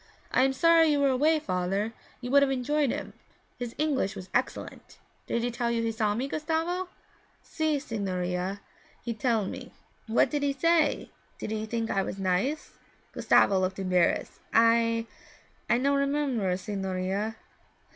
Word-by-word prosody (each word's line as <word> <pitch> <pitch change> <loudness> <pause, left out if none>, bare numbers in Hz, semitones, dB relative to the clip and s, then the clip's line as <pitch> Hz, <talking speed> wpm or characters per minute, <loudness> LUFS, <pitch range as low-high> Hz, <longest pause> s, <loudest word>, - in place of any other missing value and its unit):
I - - +3
am 270 - +1
sorry 330 +3 +5
you 295 -2 +2
were 280 -1 +3
away, 300 +5 +3
father, 195 -2 -1 0.3
you 245 0 -5
would 280 0 +6
have 280 - +3
enjoyed 270 +2 +1
him; - - -4 0.5
his 240 -2 -5
English 285 -10 0
was 185 -1 -9
excellent. 245 - -3 0.3
Did 235 - -1
he 245 - 0
tell 235 0 -1
you 230 -1 0
he 230 - 0
saw 215 -2 0
me, 255 +4 -2
Gustavo?' 325 +5 -2 0.5
'Si, 315 -2 -1
signorina, 190 -5 -3 0.4
he 235 - -2
tell 225 -2 0
me.' - - -7 0.4
'What 230 +3 +3
did 295 - -1
he 285 -1 +1
say? 330 +3 +2 0.3
Did - - -5
he 220 0 -3
think 230 0 -2
I 195 - +1
was 190 - -4
nice?' 195 +11 -1 0.4
Gustavo 195 -1 +3
looked 185 0 -1
embarrassed. 185 -3 +1 0.2
'I 230 0 +4 0.6
I 235 - +4
no 275 +3 +2
remember, 275 -9 0
signorina.' 195 +2 -3
235 Hz, 155 wpm, -28 LUFS, 200-280 Hz, 0.6 s, would